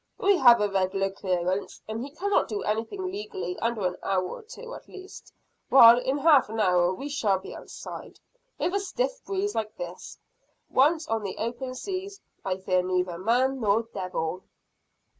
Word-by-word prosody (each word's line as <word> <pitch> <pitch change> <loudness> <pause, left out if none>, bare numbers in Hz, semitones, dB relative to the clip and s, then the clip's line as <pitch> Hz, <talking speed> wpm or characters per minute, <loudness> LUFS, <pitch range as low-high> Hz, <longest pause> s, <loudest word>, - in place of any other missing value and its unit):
We 395 0 +3
have 240 -2 +8
a 210 - +2
regular 195 0 0
clearance, 185 0 -2
and 220 +1 -4
he 270 - -5
cannot 390 +8 0
do 415 - -3
anything 230 - -2
legally 400 -2 -5
under 230 -4 -1
an 180 0 -1
hour 190 -1 0
or - - -7
two 470 +2 -10
at - - -11
least 380 0 -12 0.4
while 235 -2 +9
in 265 +3 -1
half 290 -5 +5
an 220 +1 -4
hour 180 -3 +3
we 270 +10 -5
shall 225 -9 +1
be 190 - -9
outside. - - -9 0.4
With 360 - -1
a 400 - +2
stiff - - -3
breeze 395 +1 -2
like 215 -1 -3
this, 175 0 -7 0.5
once 310 +4 +3
on 225 0 -1
the 195 -2 -5
open 245 +3 -4
seas, 390 +5 -5 0.2
I 185 -1 -1
fear 185 -1 +1
neither 180 -1 -1
man 250 +6 +1
nor 215 0 +2
devil!" 180 -2 -3
230 Hz, 175 wpm, -27 LUFS, -, 0.5 s, while